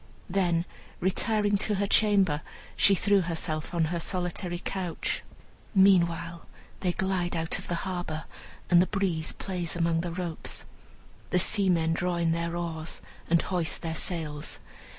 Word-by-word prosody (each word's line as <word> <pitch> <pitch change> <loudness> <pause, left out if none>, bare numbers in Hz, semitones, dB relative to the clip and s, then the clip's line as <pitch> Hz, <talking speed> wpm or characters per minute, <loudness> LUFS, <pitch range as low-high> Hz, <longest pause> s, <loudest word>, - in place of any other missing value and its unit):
Then, 175 -3 +2 0.3
retiring 205 +2 +2
to 210 +1 0
her 200 +1 +1
chamber, 195 -7 +3 0.3
she 200 - +5
threw 200 +1 +3
herself 160 -2 -2
on 170 -2 +2
her 170 - -1
solitary 180 0 -2
couch. 180 -1 -2 0.5
Meanwhile 170 -3 +3 0.3
they 180 - +1
glide 180 -1 -1
out 165 -1 0
of - - -10
the 175 - -1
harbor, 175 -4 -3 0.5
and 175 0 +8
the 185 - +2
breeze 180 -6 0
plays 180 -3 -3
among 165 -1 +1
the 175 - -3
ropes. 175 -2 -4 0.6
The - - +2
seamen 180 -4 +3
draw 175 +1 0
in 170 -1 +1
their 170 +1 -1
oars, 165 -2 -4 0.3
and 170 0 +4
hoist 175 -3 0
their 165 -1 -2
sails. 155 -3 -3
175 Hz, 145 wpm, -28 LUFS, 165-190 Hz, 0.6 s, and